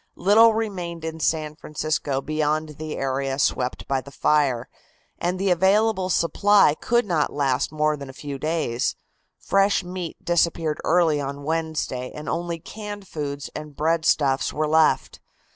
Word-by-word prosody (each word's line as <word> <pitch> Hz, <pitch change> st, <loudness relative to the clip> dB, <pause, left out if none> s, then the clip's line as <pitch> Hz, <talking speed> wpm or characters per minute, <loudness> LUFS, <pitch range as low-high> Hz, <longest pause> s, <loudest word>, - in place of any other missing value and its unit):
Little 220 Hz, +4 st, +5 dB
remained 180 Hz, -7 st, -3 dB
in 160 Hz, 0 st, -5 dB
San 155 Hz, -1 st, 0 dB
Francisco 150 Hz, -2 st, -2 dB
beyond 155 Hz, 0 st, -1 dB
the 155 Hz, -1 st, -5 dB
area 135 Hz, 0 st, -1 dB
swept 125 Hz, -2 st, -1 dB
by 135 Hz, -1 st, 0 dB
the 140 Hz, -, -12 dB
fire, 140 Hz, -3 st, +1 dB, 0.5 s
and 180 Hz, +2 st, -1 dB
the 195 Hz, 0 st, +1 dB
available 190 Hz, +2 st, +3 dB
supply 185 Hz, +1 st, +4 dB
could 235 Hz, +9 st, +1 dB
not 165 Hz, -6 st, 0 dB
last 140 Hz, -3 st, 0 dB
more 155 Hz, 0 st, +1 dB
than 140 Hz, -2 st, -9 dB
a -, -, -9 dB
few 140 Hz, -1 st, -4 dB
days. 150 Hz, -6 st, -1 dB, 0.4 s
Fresh 195 Hz, 0 st, +2 dB
meat 180 Hz, -2 st, -6 dB
disappeared 165 Hz, -2 st, +1 dB
early 160 Hz, -3 st, +3 dB
on 140 Hz, +1 st, -5 dB
Wednesday 155 Hz, -5 st, -2 dB
and 150 Hz, -, -8 dB
only 170 Hz, 0 st, -2 dB
canned 205 Hz, +3 st, -8 dB
foods 145 Hz, -3 st, -5 dB
and 150 Hz, -1 st, -7 dB
breadstuffs 150 Hz, -3 st, +1 dB
were 155 Hz, 0 st, -1 dB
left. 160 Hz, +1 st, +2 dB
155 Hz, 145 wpm, -24 LUFS, 145-175 Hz, 0.5 s, Little